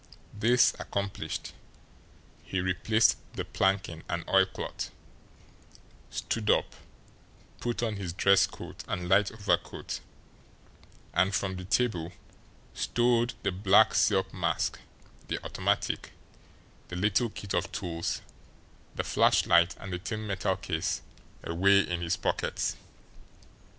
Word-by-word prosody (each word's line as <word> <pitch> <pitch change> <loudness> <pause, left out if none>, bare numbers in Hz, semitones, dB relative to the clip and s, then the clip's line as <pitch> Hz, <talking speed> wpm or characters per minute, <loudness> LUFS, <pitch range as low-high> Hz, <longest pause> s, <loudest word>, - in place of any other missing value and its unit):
This 120 +4 +4
accomplished, 100 -1 -4 0.9
he 95 - -2
replaced 95 +5 +3 0.2
the - - -4
planking 95 -4 0
and 85 0 -3
oilcloth, 95 0 +1 1.2
stood 110 -2 -2
up, - - +3 0.9
put 120 0 -2
on 110 -3 -1
his 95 -3 -4
dress 100 +2 +4
coat - - -9
and 90 -1 -3
light 95 +2 +4
overcoat, 105 -2 -2 1.1
and, 95 +3 +3
from 95 -1 -1
the 90 0 -7
table, 90 -6 0 0.6
stowed 120 0 +1
the - - +1
black 100 +3 +5
silk 95 -3 +2
mask, 85 -4 -1 0.5
the - - -1
automatic, - - -1 0.7
the 90 - -7
little 105 +5 +2
kit 100 -2 -7
of - - 0
tools, 85 -1 -3 0.7
the - - -1
flashlight, 85 +1 +4
and 95 -1 -6
the 90 - -2
thin 110 +3 -4
metal 95 -3 0
case - - -2 0.4
away 100 +4 +4
in 90 -2 -3
his 85 0 0
pockets. - - -1
95 Hz, 115 wpm, -29 LUFS, 90-105 Hz, 1.2 s, black